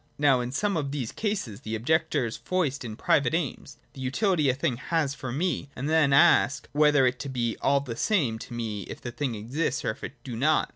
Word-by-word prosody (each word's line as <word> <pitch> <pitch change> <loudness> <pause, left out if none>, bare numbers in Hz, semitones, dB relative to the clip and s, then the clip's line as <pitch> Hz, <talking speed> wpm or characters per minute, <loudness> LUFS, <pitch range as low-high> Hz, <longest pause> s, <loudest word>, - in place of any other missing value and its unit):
Now 140 -3 +4
in 120 0 -4
some 200 +6 0
of 140 -3 -2
these 135 -6 -3
cases, 195 - -3
the 110 -3 -4
objectors 130 0 0
foist 160 -8 -1
in 110 -3 -6
private 135 +4 +2
aims, 145 -3 -4 0.2
the 135 - -9
utility 150 - +1
a 130 - +2
thing 130 -3 -1
has 150 +1 -1
for 130 -3 -6
me, 145 0 -1
and 135 +3 -3
then 155 -3 +3
ask, 140 -2 +4
whether 150 -2 +4
it 125 +1 0
be 120 -3 -1
all 140 0 +3
the 125 -5 -6
same 135 - +1
to 120 - -8
me 110 -3 -3
if - - -7
the 120 - -6
thing 130 -2 -2
exist 125 +6 -2
and 110 - -1
if 140 - -19
it - - -5
do 125 -4 -6
not. 150 +6 +2
135 Hz, 220 wpm, -27 LUFS, 120-155 Hz, 0.2 s, Now